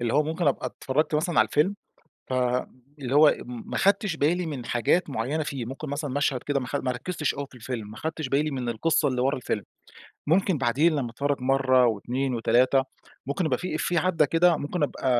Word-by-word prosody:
اللي 120 -1 -1
هو 150 - +5
ممكن 160 +2 -2
أبقى 140 - +1
اتفرجت 150 +4 -1
مثلًا 160 +2 +1
على - - +6
الفيلم، 185 +7 +2 0.6
فاللي 130 +2 -2
هو 150 +1 +7
م 120 -1 -9
ما - - -2
خدتش 200 -3 +2
بالي 170 +4 +1
من 140 -6 -5
حاجات 140 +8 +1
معينة 135 +7 -1
فيه، 140 -4 -4
ممكن 135 +6 -7
مثلًا 145 0 -3
مشهد 140 -2 0
كده 145 -1 -1
ماخد 135 +2 -3
ما 130 - +1
ركزتش 150 +5 -2
أوي 140 0 -4
في - - -18
الفيلم، 115 -3 -6
ما 110 - -10
خدتش 160 +2 -4
بالي 145 +3 +1
من 130 -4 -3
القصة 145 +6 +1
اللي 125 -2 -1
ورا 135 +2 +1
الفيلم. 115 -4 -3 0.7
ممكن 180 0 +2
بعدين 140 +6 +2
لما 125 -5 -2
أتفرج 140 +3 -1
مرّة 130 -1 +3
و2 125 +4 -1
و3 125 +3 +3 0.4
ممكن 145 +6 -1
يبقى 130 -5 0
في 180 -3 -4
إفيه 170 +2 0
عدَّى 165 -3 +2
كده 165 +2 +4
ممكن 145 +5 -3
أبقى 145 - -2
140 Hz, 200 wpm, -26 LUFS, 125-155 Hz, 0.7 s, هو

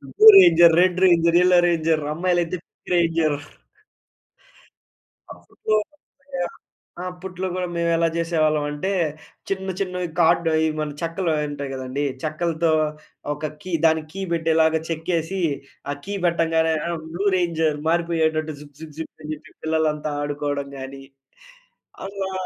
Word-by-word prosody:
Blue - - +5
ranger, 170 -2 +7
red 180 0 +3
ranger, 170 -1 +4
yellow 180 0 +5
ranger 160 -2 +1
అమ్మాయిలు 175 +2 +1
అయితే 170 +2 -4
pink - - -14
ranger. 165 -3 +2 2.0
అప్పట్లో 215 - -3
గూడ 215 - +2 1.2
ఆ! - - -5
అప్పట్లో 185 +1 -6
గూడా 180 -1 -2
మేము 170 0 +1
ఎలా 165 - +2
చేసేవాళ్ళం 155 -3 +1
అంటే 150 +7 -2 0.6
చిన్న 190 0 -2
చిన్నవి 180 -2 -2
కార్డ్ 165 0 +4
ఇవి 160 0 +2
మన 150 -1 -3
చెక్కలు 165 +1 -1 0.2
ఉంటాయి 140 -1 -5
కదండీ. 130 +2 -3 0.2
చెక్కలతో 160 +1 0 0.6
ఒక 150 +1 -11 0.2
కీ. 185 - -7
దానికి 160 -1 +2
కీ 195 - -5
పెట్టేలాగా 160 -1 +2
చెక్కేసి. 165 +3 -2 0.5
ఆ - - 0
కీ 200 - -4
పెట్టంగానే 165 -1 +2 0.2
ఆహ్, 170 -2 -3
బ్లూ 190 +4 -3
రేంజర్ 160 -3 0
మారిపోయేటట్టు 160 -2 0
జుక్ 145 -1 -15
జుక్ 155 -2 -9
జుక్ 160 - -6
అని 155 - -5
చెప్పి 150 - -12
పిల్లలంతా 155 -1 0
ఆడుకోవడం 145 -1 -3
గాని. 135 +1 -8 1.0
"అమ్మా! 195 -1 -4
165 Hz, 135 wpm, -22 LUFS, 155-175 Hz, 2.0 s, రేంజర్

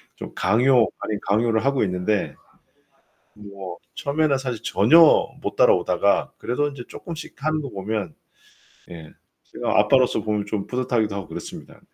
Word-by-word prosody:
좀 - - -9
강요 125 0 +3
아닌 105 -1 -3
강요를 110 +2 +1
하고 140 -3 +1
있는데 95 +2 -1 1.0
뭐 100 -3 -9 0.2
처음에는 145 -1 0
사실 125 -4 -5
전혀 115 - +5 0.4
못 - - -4
따라오다가 - - +2
그래도 145 +5 -1
인제 135 -4 -9
쪼끔씩 165 -2 -9
하는 155 0 0
거 140 -3 -6
보면 100 -4 -4 0.8
예 80 -3 -11 0.3
제가 - - -1
아빠로서 130 -4 +3
보면 105 -1 -1
좀 105 -1 -3
뿌듯하기도 125 -4 -1
하고 100 -4 -6
그렇습니다. 85 +1 -9
110 Hz, 315 characters per minute, -23 LUFS, 100-130 Hz, 1.0 s, 전혀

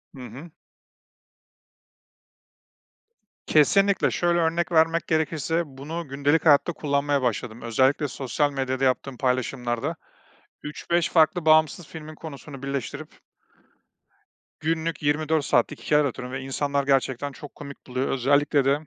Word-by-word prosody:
Hı 130 - -10
hı. 155 +8 -11 3.0
Kesinlikle. 195 +6 +3
Şöyle 175 0 +1
örnek 170 +1 0
vermek 165 0 +3
gerekirse, 160 +1 0
bunu 150 +4 -7
gündelik 140 +4 +1
hayatta 155 +2 +5
kullanmaya 145 -1 0
başladım, 120 -1 -2
özellikle 130 +5 +2
sosyal 140 +2 -1
medyada 135 -1 -2
yaptığım 130 0 0
paylaşımlarda. 125 -2 -1 0.7
3-5 170 +3 -1
farklı 165 +1 +3
bağımsız 155 +1 +3
filmin 155 0 -9
konusunu 145 -3 -10
birleştirip 140 +2 -4 1.5
günlük 160 0 -2
24 155 +1 +1
saatlik - - +1
hikâyeler 150 -1 +3
atıyorum 125 +1 -8
ve 135 - -4
insanlar 140 +1 -1
gerçekten 135 0 0
çok 145 +1 -12
komik 140 -1 -11
buluyor, 130 +1 -2
özellikle 140 +2 +2
de 140 +2 +3
145 Hz, 115 wpm, -25 LUFS, 135-160 Hz, 3.0 s, hayatta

